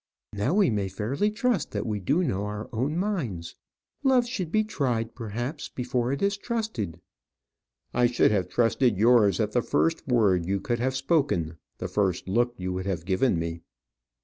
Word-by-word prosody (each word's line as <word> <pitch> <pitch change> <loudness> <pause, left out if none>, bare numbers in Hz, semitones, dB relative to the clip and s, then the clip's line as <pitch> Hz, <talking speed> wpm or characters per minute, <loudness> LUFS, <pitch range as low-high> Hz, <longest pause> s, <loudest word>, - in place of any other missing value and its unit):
Now 105 - 0
we 200 - +4
may 100 -2 0
fairly 115 - -1
trust 230 -1 0
that - - -2
we 105 -2 -2
do 145 - +1
know 100 - -1
our 105 +1 -5
own 135 +8 -1
minds. 145 - -2 0.5
Love 260 -3 +4
should 195 -10 -4
be 215 +2 +3
tried, 125 - -1
perhaps, 120 +5 -5
before 125 0 -1
it 140 - -2
is 200 0 +1
trusted." 205 - -3 0.9
"I 125 0 +4
should 120 - +3
have 95 -4 0
trusted 120 -1 +2
yours 110 -3 +5
at - - 0
the - - +2
first 80 - 0
word 105 -8 +3
you 100 +1 0
could 120 +4 -2
have 130 +2 0
spoken, 135 - 0 0.2
the - - -4
first 95 -4 0
look 120 +5 +1
you 90 0 -3
would 95 +1 -4
have 85 -4 -2
given 95 +3 +2
me." 85 0 -3
120 Hz, 175 wpm, -27 LUFS, 95-150 Hz, 0.9 s, yours